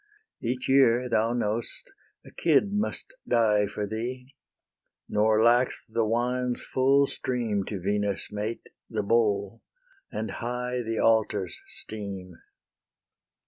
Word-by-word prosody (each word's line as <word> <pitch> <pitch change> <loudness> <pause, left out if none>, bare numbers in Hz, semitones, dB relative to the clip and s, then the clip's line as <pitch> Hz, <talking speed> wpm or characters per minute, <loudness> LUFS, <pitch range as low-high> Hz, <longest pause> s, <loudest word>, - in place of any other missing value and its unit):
Each 125 +2 -2
year, 125 -2 +4
thou 115 -1 +2
know'st, 115 -1 -2 0.3
a - - -13
kid 170 +5 +2
must 210 - -2
die 105 -3 +3
For 105 +1 -3
thee; 125 +5 -5 0.7
nor 110 +1 +3
lacks 120 +2 +3
the 115 +1 0
wine's 125 +2 0
full 135 +2 +3
stream 120 -7 -2
To 100 - -4
Venus' 100 +1 -1
mate, 105 +2 -4 0.2
the - - -2
bowl; 105 -1 +1 0.5
and 110 -1 -3
high 125 +3 -3
The 115 -1 -3
altars 105 -5 +1
steam. 95 -5 -6
115 Hz, 115 wpm, -27 LUFS, 105-125 Hz, 0.7 s, year